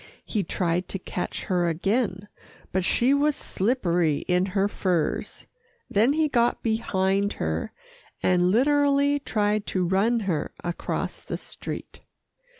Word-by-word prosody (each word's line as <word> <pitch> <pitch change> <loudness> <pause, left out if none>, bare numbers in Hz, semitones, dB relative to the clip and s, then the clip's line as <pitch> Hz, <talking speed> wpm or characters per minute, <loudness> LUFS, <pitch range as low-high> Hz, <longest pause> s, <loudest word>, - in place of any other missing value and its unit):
He 215 - -1
tried 175 +1 -1
to - - -2
catch 180 -1 -4
her 175 -2 +1
again, 195 +3 -1 0.4
but 185 0 0
she 245 +8 +3
was 290 +1 +2
slippery 180 - 0
in 180 +1 +2
her 195 +1 +1
furs, 180 -5 -1 0.5
then 225 +7 +4
he 315 0 +2
got 240 -4 +1
behind 200 -3 +1
her, 80 0 -2 0.5
and 180 0 +3
literally 285 +4 +3
tried 210 -5 0
to 185 -2 0
run 215 +6 +2
her 180 -7 -2
across 175 -1 -3
the - - -5
street. - - -7
200 Hz, 130 wpm, -25 LUFS, 180-240 Hz, 0.5 s, then